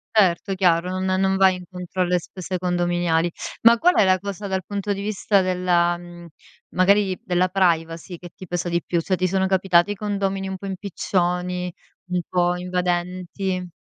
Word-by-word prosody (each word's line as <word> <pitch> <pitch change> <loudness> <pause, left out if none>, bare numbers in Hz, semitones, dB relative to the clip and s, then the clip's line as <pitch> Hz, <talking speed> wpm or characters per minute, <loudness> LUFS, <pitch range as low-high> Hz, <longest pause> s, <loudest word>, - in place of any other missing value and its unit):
Certo, 195 -1 +3
chiaro, 180 0 +2
non 185 0 0
non 190 0 +2
vai 190 -1 +5
incontro 180 0 -6
alle 180 0 +2
spese 185 +2 -6
condominiali. 175 -1 0 0.3
Ma 230 +1 +7
qual 355 +9 +3
è - - +5
la 185 0 +4
cosa 200 +1 -5
dal 190 -1 -2
punto 205 0 -3
di 200 - -5
vista 205 -1 +1
della 180 -2 +2
mhmm, 175 0 -12 0.4
magari, 195 +1 +3
della 180 -3 +1
privacy 170 -2 0
che 175 +1 -11
ti 185 - -10
pesa 175 0 -2
di 170 0 0
più? 170 - 0
Cioè, 185 +3 0
ti 185 0 0
sono 190 +1 +1
capitati 185 0 +3
i 205 - -3
condomini 195 -1 -2
un 190 - -4
po' 200 - -9
impiccioni, 180 -2 -2 0.4
un 180 -1 0
po' 175 -1 +1
invadenti? 180 +1 -2
185 Hz, 175 wpm, -23 LUFS, 175-195 Hz, 0.4 s, Ma